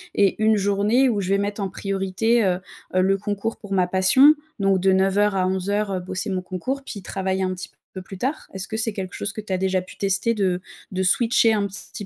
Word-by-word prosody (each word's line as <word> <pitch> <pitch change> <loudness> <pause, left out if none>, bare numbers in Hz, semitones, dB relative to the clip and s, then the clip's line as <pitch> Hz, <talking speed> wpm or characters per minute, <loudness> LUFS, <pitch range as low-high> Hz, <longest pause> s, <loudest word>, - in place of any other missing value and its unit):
et 200 +1 +2
une 220 0 +4
journée 205 +6 +2
où 210 -3 0
je 185 - -3
vais 195 +1 +2
mettre 205 +1 -2
en 195 - -2
priorité, 195 +4 0
heu, 180 -1 +1 0.4
heu, 185 - +4
le 195 +1 +2
concours 205 +2 -3
pour 205 -2 -7
ma 185 -2 +3
passion, 190 +11 +6 0.3
donc 195 -1 +2
de 190 +1 +3
9:00 195 +2 +2
à 185 -1 +1
11:00, 200 +2 -1
heu, 185 - -1
bosser 185 +3 -4
mon 185 -1 -1
concours 225 +10 -4
puis 200 - -7
travailler 190 +1 -2
un 185 0 -1
petit 185 - -7
peu - - -33 0.3
plus 190 -1 -10
tard? 275 +5 -2
Est-ce 190 0 -5
que 220 - -4
c'est 225 -1 0
quelque 190 -2 -5
chose 200 - -4
que 215 - -5
tu 205 - -9
as 185 - +1
déjà 190 0 0
pu 185 - -13
tester 205 +4 +1
de 185 -3 0 0.3
de 185 0 -2
switcher 225 +3 +3
un 205 -1 +1
petit 200 +1 -8
195 Hz, 240 wpm, -23 LUFS, 185-210 Hz, 0.4 s, passion